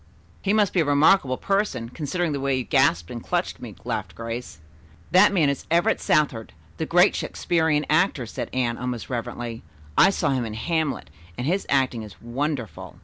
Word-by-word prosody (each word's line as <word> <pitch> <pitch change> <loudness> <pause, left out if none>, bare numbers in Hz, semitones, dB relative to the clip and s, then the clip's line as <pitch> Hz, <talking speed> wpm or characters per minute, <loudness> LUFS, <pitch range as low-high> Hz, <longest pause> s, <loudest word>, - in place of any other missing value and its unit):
"He 200 - 0
must 210 -2 +2
be 185 - +2
a 160 - +3
remarkable 145 -1 +4
person, 195 - -1
considering 160 +4 -2
the 140 - -2
way 135 -1 0
you 130 - -1
gasped 120 - +2
and 120 -1 -6
clutched - - -2
me," - - -8
laughed - - -3
Grace. 115 +2 -6 0.5
"That 185 - +6
man 170 -7 +3
is 140 -1 -2
Everett 170 +2 +2
Southard, 135 -7 +1 0.2
the - - -3
great - - +5
Shakespearian 160 -3 0
actor," 155 -5 +2
said 110 - -5
Anne 120 -2 -1
almost 125 0 -4
reverently. 120 -1 -4 0.3
"I - - +7
saw 170 -7 0
him 130 -2 0
in 110 -2 -5
'Hamlet' 160 +4 -2 0.3
and 125 - -3
his 185 +6 0
acting 130 -4 +1
is 105 -4 -11
wonderful." 125 0 -4
140 Hz, 180 wpm, -24 LUFS, 120-160 Hz, 0.5 s, I